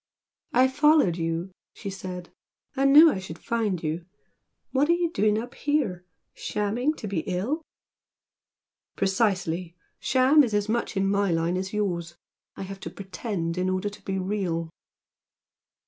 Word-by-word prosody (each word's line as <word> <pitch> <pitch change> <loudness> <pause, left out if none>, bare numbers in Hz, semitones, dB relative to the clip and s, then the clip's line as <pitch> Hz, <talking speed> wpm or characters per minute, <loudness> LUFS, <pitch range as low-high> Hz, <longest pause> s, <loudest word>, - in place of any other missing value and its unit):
"I 255 +2 +5
followed 285 - +4
you" 165 +2 -2 0.2
she 200 - -6
said 180 -2 -7 0.4
"I 270 0 +2
knew 300 +4 +9
I 190 - -3
should 180 -3 -8
find 215 -7 -1
you! 160 +2 -2 0.7
What 280 +3 +2
are - - +6
you 345 -1 0
doing 210 -6 +2
up 240 +3 -5
here? 245 -13 -1 0.3
Shamming 235 +9 -1
to 215 - -6
be 195 -4 -1
ill?" 205 - -1 1.3
"Precisely! 185 -4 0 0.2
'Sham' 270 +3 +5
is 225 -5 -1
as 205 0 +1
much 225 -2 -1
in 195 0 +2
my 200 0 +2
line 165 +1 +1
as 190 +1 -3
yours. 175 -5 -2 0.4
I - - -6
have 195 +1 -7
to - - -6
'pretend' 190 -3 -4
in 185 +1 +1
order 185 +2 -1
to 205 - -13
be 190 0 -2
real!" 185 -4 -2
195 Hz, 150 wpm, -26 LUFS, 180-240 Hz, 1.3 s, knew